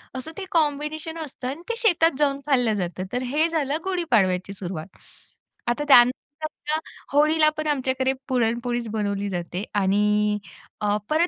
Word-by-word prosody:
असं 260 +5 -6
ते 390 - -4
कॉम्बिनेशन 310 +1 0
असतं 265 -3 -7
आणि 280 +6 -4
ते 470 - 0
शेतात 350 -8 +4
जाऊन 280 -2 +2
खाल्लं 245 -6 +3
जातं. 185 -1 -3
तर 250 - 0
हे 295 +6 +2
झालं 300 -3 0
गुढीपाडव्याची 210 - +1
सुरुवात 185 -2 -7 0.7
आता 240 +5 0
त्यानंतर 290 +5 +3 0.3
होळीला 305 +1 +5
पण 310 0 -2
आमच्याकडे 265 -2 +1 0.2
पुरणपोळीच 240 -1 0
बनवली 205 -2 -1
जाते 180 +1 -4
आणि 210 +1 +2 0.4
अ, 210 0 +2
परत 320 +3 +3
260 Hz, 140 wpm, -24 LUFS, 210-310 Hz, 0.7 s, होळीला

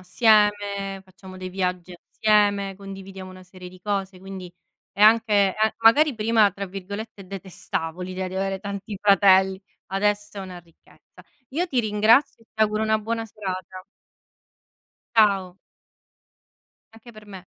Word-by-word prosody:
assieme, 205 0 +2
facciamo 185 0 -14
dei 185 0 -6
viaggi 180 -1 -3
assieme, 205 -2 +1
condividiamo 195 -1 -10
una 185 0 -13
serie 180 0 -12
di 185 0 -16
cose, 195 -2 -3
quindi 190 -2 -9 0.4
è 195 - -9
anche 210 -3 +5
ehm, 220 0 +2
magari 270 +6 +5
prima, 220 -1 +3
tra 200 +1 -6
virgolette, 200 +2 -8
"detestavo" 180 -3 -5
l'idea 185 0 -4
di 185 - -9
avere 195 0 -2
tanti 200 0 -6
fratelli, 190 -1 +4 0.3
adesso 205 +1 -1
è - - -4
una 185 -2 -8
ricchezza. 170 -1 -21 0.3
Io 335 +7 -1
ti 260 -7 0
ringrazio 220 +4 +3
e - - -26
ti 220 - -8
auguro 215 0 +1
una 220 0 +2
buona 225 +1 -3
serata. 185 -3 -7 1.3
Ciao. 195 -4 +3 1.4
Anche 225 +2 -15
per 215 -1 -15
me. 190 -2 -11
195 Hz, 140 wpm, -23 LUFS, 185-215 Hz, 1.4 s, anche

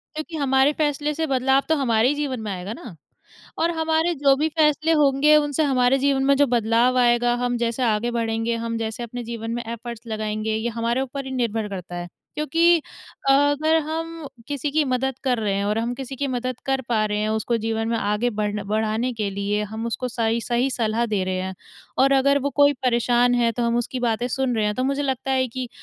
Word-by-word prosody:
क्योंकि 310 +1 -5
हमारे 270 0 +3
फ़ेेसले 295 0 0
से 320 +1 -1
बदलाव 265 0 +2
तो 320 - +4
हमारे 235 -4 +2
ही 290 - +1
जीवन 285 -4 -3
में 215 -1 -5
आएगा 185 +3 -5
ना, 230 -4 -9 0.6
और 335 - +2
हमारे 320 +2 +1
जो 280 -2 +4
भी 310 +3 +1
फ़ेेसले 310 0 +2
होंगे 295 0 +4
उनसे 295 0 +1
हमारे 265 -1 +3
जीवन 270 0 +1
में 280 - +4
जो 285 - +4
बदलाव 235 +1 +2
आएगा, 240 0 +3
हम 245 0 0
जैसे 235 +2 -1
आगे 225 +1 +1
बढ़ेंगे, 230 0 -1
हम 230 0 -3
जैसे 225 +1 -4
अपने 240 +1 -6
जीवन 230 -1 -5
में 240 - -3
एफ़र्ट्स 235 0 -7
लगाएँगे, 215 0 -2
ये 220 +2 -1
हमारे 235 +2 0
ऊपर 270 +1 -5
ही - - -6
निर्भर 225 -4 -1
करता 185 -3 -7
है। 175 0 -5 0.3
क्योंकि 330 +3 +3 0.5
अगर 290 +3 +3
हम 330 0 -4 0.2
किसी 290 0 -2
की 310 -1 +2
मदद 260 0 -1
कर 250 -2 +1
रहे 210 -3 -1
हैं 200 +1 -1
और 210 +2 0
हम 235 +2 -1
किसी 270 +1 -7
की 280 - -1
मदद 255 -1 -3
कर 270 0 +1
पा 220 -3 +2
रहे 210 0 -2
हैं, 215 +1 0
उसको 220 +2 0
जीवन 225 0 -2
में 230 - 0
आगे 210 +4 0
बढ़ 210 -1 -2
बढ़ाने 220 +3 0
के 215 -3 -2
लिए 200 +2 -1
हम 225 +1 -4
उसको 250 +2 -3
सही-सही 235 +2 0
सलाह 230 -1 0
दे 195 -2 +1
रहे 185 0 -2
हैं 190 0 -4 0.5
और 275 +1 +4
अगर 280 +1 +4
वो - - 0
कोई 285 0 +6
परेशान 245 0 +3
है 240 -1 +2
तो 240 +2 -3
हम 235 0 +1
उसकी 245 +2 -3
बातें 240 0 0
सुन 260 -2 -1
रहे 215 - +1
हैं, 210 - 0
तो 255 - -1
मुझे 275 +2 0
लगता 270 -1 -2
है 260 -1 +2
कि 255 +1 -5
245 Hz, 220 wpm, -23 LUFS, 225-275 Hz, 0.6 s, कोई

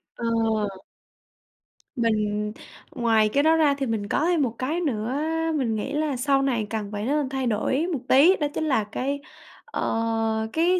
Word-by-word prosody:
Ờ. - - -8 1.7
Mình 210 -3 0 0.4
ngoài 225 -3 +3
cái 280 +6 +2
đó 320 +1 +5
ra 305 -3 +4
thì 270 - -1
mình 220 -3 -2
có 295 - +1
thêm 340 -3 +2
một 240 -4 -1
cái 310 +7 -1
nữa, 245 -5 -1 0.4
mình 245 -7 0
nghĩ 215 +6 -3
là 300 -1 0
sau 275 +1 +2
này 235 -6 0
cần 215 -2 -3
phải 205 0 -3
nên 285 +1 0
thay 265 -1 -2
đổi 260 +8 0
một 285 - -1
tí, 320 +9 +6
đó 295 - -1
chính - - -2
là 260 -8 +2
cái, 265 +7 -3 0.5
ờ, 225 -1 -1
cái 350 +3 +3
255 Hz, 170 wpm, -25 LUFS, 220-290 Hz, 1.7 s, tí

